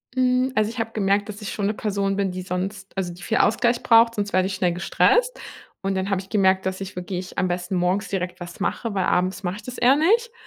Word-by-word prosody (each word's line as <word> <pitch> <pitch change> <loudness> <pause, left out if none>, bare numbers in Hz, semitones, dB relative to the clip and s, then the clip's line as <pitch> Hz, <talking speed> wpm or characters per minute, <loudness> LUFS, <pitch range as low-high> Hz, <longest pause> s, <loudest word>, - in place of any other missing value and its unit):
Hm, 255 0 +2
also, 215 0 +2
ich 230 - -9
habe 225 0 -2
gemerkt, 200 -1 +1
dass 210 +1 -7
ich 210 - -5
schon 200 -2 -1
'ne 215 - 0
Person 200 -2 -1
bin, 195 -2 0
die 185 0 -5
sonst 185 +2 -4
also, 180 -2 -2
die 180 - -14
viel 225 - -1
Ausgleich 235 +2 +2
braucht, 230 0 +5
sonst 205 -2 -3
werde 185 0 +3
ich 195 - -3
schnell 180 -3 +1
gestresst. 480 - +2 0.4
Und 195 0 -1
dann 190 +1 -1
habe 195 -1 0
ich 190 - -16
gemerkt, 190 -2 +2
dass 190 +1 -3
ich 190 -1 -6
wirklich 180 0 -5
am 185 - +1
besten 175 +1 -2
morgens 180 +3 0
direkt 180 -1 -3
was 175 +3 -9
mache, 220 +2 -2
weil 190 -2 0
abends 185 +2 0
mache 180 0 -2
ich 210 - -10
das 250 +2 -8
eher 255 +3 +5
nicht. 450 +10 +2
195 Hz, 250 wpm, -23 LUFS, 185-225 Hz, 0.4 s, braucht